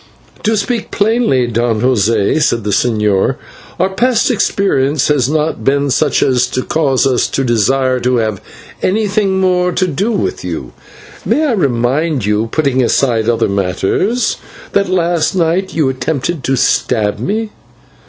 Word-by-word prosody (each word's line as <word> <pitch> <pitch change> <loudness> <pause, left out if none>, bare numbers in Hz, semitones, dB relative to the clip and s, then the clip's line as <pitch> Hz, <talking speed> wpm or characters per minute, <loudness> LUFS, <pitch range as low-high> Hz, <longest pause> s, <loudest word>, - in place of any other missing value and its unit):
"To 220 +1 +1
speak 230 +2 -2
plainly, 210 - +1
Don 115 -1 -1
José," 115 +1 +1
said 120 -6 +1
the 105 - -2
señor, 105 -3 +1 0.4
"our 185 +2 +2
past 235 +4 +1
experience 150 - +1
has 135 -4 +2
not 155 +1 -1
been 140 0 +1
such 145 +2 +1
as 125 -2 +2
to 130 - -3
cause 140 -5 +1
us 130 -2 +1
to 135 - -2
desire 130 +2 +1
to 125 +1 0
have 110 -4 -1 0.4
anything 200 -1 0
more 180 -1 +1
to 185 - +1
do 185 +7 -1
with 305 - -2
you. - - -6 0.5
May 310 - +1
I 290 - +1
remind 140 - 0
you, 105 +2 0
putting 135 0 0
aside 120 -2 +1
other 115 - +1
matters, 100 - 0 0.3
that 200 -2 +1
last 175 -1 0
night 180 +2 0
you 155 -4 +2
attempted 135 +3 -3
to 135 - +1
stab 110 -4 0
me?" 215 +2 -2
140 Hz, 150 wpm, -14 LUFS, 120-190 Hz, 0.5 s, our